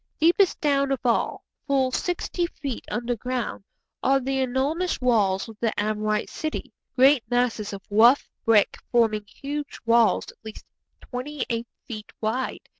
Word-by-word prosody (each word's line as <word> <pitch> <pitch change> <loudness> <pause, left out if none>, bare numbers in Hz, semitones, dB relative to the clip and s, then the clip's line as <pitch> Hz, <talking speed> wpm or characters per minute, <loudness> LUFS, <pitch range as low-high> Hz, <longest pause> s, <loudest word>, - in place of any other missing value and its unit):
Deepest 350 +4 +4
down 280 -2 +2
of 270 - 0
all, 235 -2 +1 0.2
full 265 -2 +2
sixty 350 +3 -1
feet 275 -7 -6
underground, 240 -2 -3 0.4
are 270 +1 +3
the 270 +1 -1
enormous 275 +8 0
walls 210 -6 +2
of 225 - -10
the 230 -2 +1
Amorite 215 0 0
city; 310 0 -5 0.2
great 270 +1 +6
masses 245 -4 0
of 200 -1 -7
rough 235 +6 +6 0.2
brick 220 -3 +4
forming 215 -3 +2
huge 290 +3 -6
walls 230 -1 +4
at - - -30
least 220 -1 -9 0.4
twenty 265 +2 -5
eight 230 0 -2 0.2
feet 215 -5 -7
wide. 235 +4 -2
245 Hz, 140 wpm, -25 LUFS, 220-275 Hz, 0.4 s, great